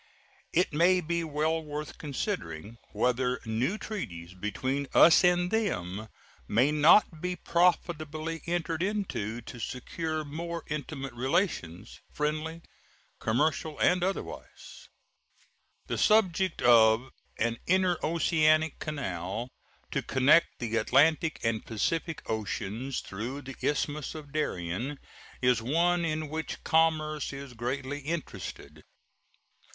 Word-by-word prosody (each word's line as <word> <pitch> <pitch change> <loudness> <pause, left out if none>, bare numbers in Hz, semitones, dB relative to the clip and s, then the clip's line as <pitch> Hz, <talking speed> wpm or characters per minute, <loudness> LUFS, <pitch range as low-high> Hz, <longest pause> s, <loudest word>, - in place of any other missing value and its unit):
It 180 -2 +2
may 175 +4 +4
be 170 0 -1
well 160 +1 0
worth 150 0 -6
considering 115 - -4
whether 125 0 +1
new 120 - 0
treaties 90 - -6
between 130 +9 -2
us 165 - +8
and 180 0 +3
them 110 - -1 0.4
may 125 +7 +3
not 155 +2 +5
be 180 0 -2
profitably 165 -2 0
entered 170 -1 -1
into, 185 - -2
to 120 +1 -10
secure 155 +7 -3
more 170 +3 -5
intimate 145 -3 -4
relations 130 - -1
friendly, 155 +2 -2 0.6
commercial, 150 +6 0
and 180 0 +3
otherwise. 190 +2 -5 1.0
The - - -3
subject 190 -5 +3
of 115 +1 +5 0.3
an 115 +1 0
interoceanic 160 -3 +2
canal 115 - -4 0.4
to - - 0
connect 140 +6 +4
the 115 -1 -2
Atlantic 155 +8 +3
and 115 -1 0
Pacific 160 +9 -2
oceans 110 +4 -3
through 120 +9 -6
the 135 0 -8
Isthmus 145 +1 -1
of 150 -2 -9
Darien 120 - -2 0.5
is 125 -2 +4
one 170 +8 +2
in 155 -1 -1
which 160 +2 -5
commerce 155 -2 +2
is 140 -2 -8
greatly 130 +4 -3
interested. 140 - -6
150 Hz, 110 wpm, -29 LUFS, 120-165 Hz, 1.0 s, us